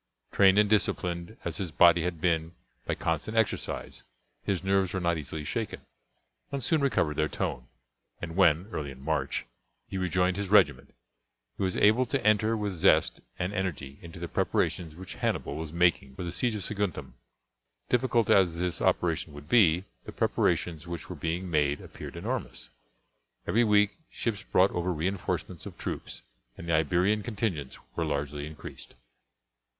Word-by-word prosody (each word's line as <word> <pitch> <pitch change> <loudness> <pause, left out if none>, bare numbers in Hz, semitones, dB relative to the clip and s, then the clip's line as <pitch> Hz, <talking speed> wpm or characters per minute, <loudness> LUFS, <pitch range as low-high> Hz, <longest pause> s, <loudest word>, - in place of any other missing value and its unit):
Trained 95 -1 +5
and 105 0 +5
disciplined 90 -2 0
as - - -2
his 95 -4 -3
body 85 +3 +6
had 85 -1 -2
been 85 0 0 0.3
by - - 0
constant 85 +7 -2
exercise, 110 -1 -1 0.4
his 95 -3 -1
nerves 95 -1 +1
were - - 0
not 85 -1 +1
easily 75 +1 -6
shaken, 105 +8 -3 0.7
and 140 -2 -1
soon 155 +4 +2
recovered 80 - +1
their 75 - +2
tone, 60 +1 -3 0.5
and 80 -1 -6
when, 90 -2 +4
early 75 -2 -3
in 65 -1 -10
March, 80 +3 -1 0.4
he 95 - -4
rejoined 90 0 +1
his 100 -2 -3
regiment, 80 -11 +3 0.6
he - - -8
was 95 -1 0
able 110 +5 +4
to 135 -1 -1
enter 110 +1 +3
with 105 -2 -2
zest 85 - +3 0.2
and 90 +3 -2
energy 80 -8 -3
into 85 0 -10
the 85 - -4
preparations 80 -1 -1
which 95 +2 -8
Hannibal 70 - -2
was 80 0 -5
making 85 -6 +2
for 90 - -5
the 85 - -3
siege 115 +5 0
of 105 - -3
Saguntum. 100 -5 -3 0.8
Difficult 120 -2 +2
as 90 -4 +4
this 85 0 -1
operation - - +1
would 75 0 -11
be, 90 -4 +5 0.2
the - - -7
preparations 85 -1 0
which 85 -2 -6
were - - -5
being 85 +3 -2
made 75 -3 +1
appeared - - -9
enormous. - - -4 0.7
Every 120 +3 +3
week 105 -2 +3
ships 110 -4 -3
brought 95 +2 +3
over 90 +1 -1
reinforcements 90 +4 -3
of - - -10
troops, - - -5 0.3
and 85 - -8
the 85 - +1
Iberian 90 +7 +2
contingents 100 - -3 0.2
were 85 - 0
largely 75 -1 -2
increased. 75 -1 -10
90 Hz, 165 wpm, -28 LUFS, 80-100 Hz, 0.8 s, body